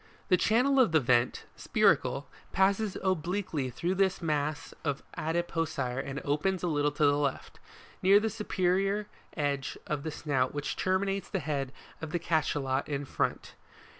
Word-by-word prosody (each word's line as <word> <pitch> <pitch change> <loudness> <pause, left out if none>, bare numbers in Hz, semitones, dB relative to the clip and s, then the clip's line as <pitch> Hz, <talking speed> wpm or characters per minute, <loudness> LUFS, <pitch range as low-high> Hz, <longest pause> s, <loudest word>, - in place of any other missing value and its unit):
The 185 - +6
channel 250 +8 +3
of 230 -11 +4
the 160 - +6
vent, 120 -2 +2
(spiracle) - - +2 0.3
passes 195 +1 +2
obliquely 180 -5 -1
through 170 +9 -1
this 190 0 +1
mass 150 -2 -2
of 145 -3 -2
adipocire 165 -6 -1
and 135 0 -5
opens 165 +6 0
a - - +1
little 145 -2 +2
to 150 - +2
the 145 0 +4
left, 140 -2 -3 0.4
near 195 +2 +6
the 220 +1 -1
supe 210 0 -7
rior 195 +3 +2 0.3
edge 140 -2 -1
of 150 -2 -2
the 160 - -4
snout 140 -4 -1
which 145 -1 -2
terminates 195 +1 0
the 200 - -1
head 140 -5 -2 0.3
of 160 -1 -6
the 175 - +1
Cachalot 145 -5 0
in 140 -1 -2
front. - - -2
160 Hz, 160 wpm, -30 LUFS, 145-190 Hz, 0.4 s, The